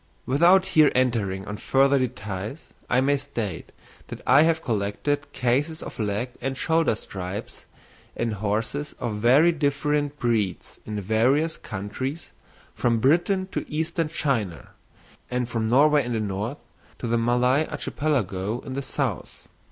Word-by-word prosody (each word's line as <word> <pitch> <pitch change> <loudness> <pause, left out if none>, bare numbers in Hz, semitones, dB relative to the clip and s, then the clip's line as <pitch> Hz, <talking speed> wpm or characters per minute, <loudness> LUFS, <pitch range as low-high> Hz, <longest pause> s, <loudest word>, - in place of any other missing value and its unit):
Without 175 +8 +5
here 155 -5 +5
entering 110 -7 0
on 105 0 -5
further 135 +4 +3
details 110 - -5 0.2
I 125 - +3
may 140 +2 +3
state 115 -10 -5 0.4
that - - -7
I 145 - +6
have 165 0 +2
collected 115 +7 -1
cases 140 +6 0
of - - -9
leg 105 +3 -1
and 135 -1 -2
shoulder 160 -5 +2
stripes 95 -2 -7 0.5
in 115 -1 -1
horses 110 +8 -2
of 115 -4 -3
very 130 +10 +5
different 145 -1 0
breeds 110 - -1
in 105 -1 -3
various 125 - +2
countries 110 - -5 0.4
from 120 -1 +1
Britain 175 - +2
to - - -2
Eastern 160 +1 -1
China; 125 - -2 0.6
and 125 -1 -1
from 115 -2 -1
Norway 145 +3 +5
in 120 0 -3
the 115 - 0
north 105 +6 -3 0.4
to - - -6
the 115 0 +1
Malay 125 +5 +2
Archipelago 110 - -2
in 130 - -7
the 140 - -2
south. 130 - -4
125 Hz, 140 wpm, -25 LUFS, 110-145 Hz, 0.6 s, I